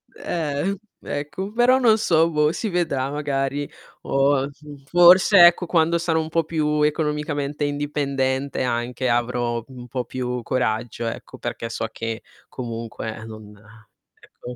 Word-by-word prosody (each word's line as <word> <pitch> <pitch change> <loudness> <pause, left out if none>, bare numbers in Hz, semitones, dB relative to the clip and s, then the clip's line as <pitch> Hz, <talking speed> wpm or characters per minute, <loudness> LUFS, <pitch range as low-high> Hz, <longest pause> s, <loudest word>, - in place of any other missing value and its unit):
Eh, 165 +4 -2 0.2
ecco, 150 +8 -5
però 245 +3 +4
non 225 -3 +5
so, 165 -5 +3
boh, 150 0 +2
si 220 - -3
vedrà 160 -7 -1
magari. 145 -1 -2 0.3
O, 135 0 +2
mhmm, 145 -1 -13
forse, 175 +3 +7
ecco, 175 +1 +2
quando 165 0 +2
sarò 165 -1 0
un 160 - -5
po' 165 0 +1
più 150 -1 0
economicamente 150 -1 -1
indipendente 140 -2 -1
anche, 125 +1 -1
avrò 120 -1 0
un 125 -2 -11
po' 125 -1 -3
più 125 -1 -3
coraggio, 120 -1 -1
ecco. 115 - -7
Perché 115 - -5
so 115 -1 -3
che 115 0 -5 0.2
comunque 115 -2 -6
non 110 -1 -11 0.7
ecco. 125 0 -11
145 Hz, 135 wpm, -23 LUFS, 125-160 Hz, 0.7 s, forse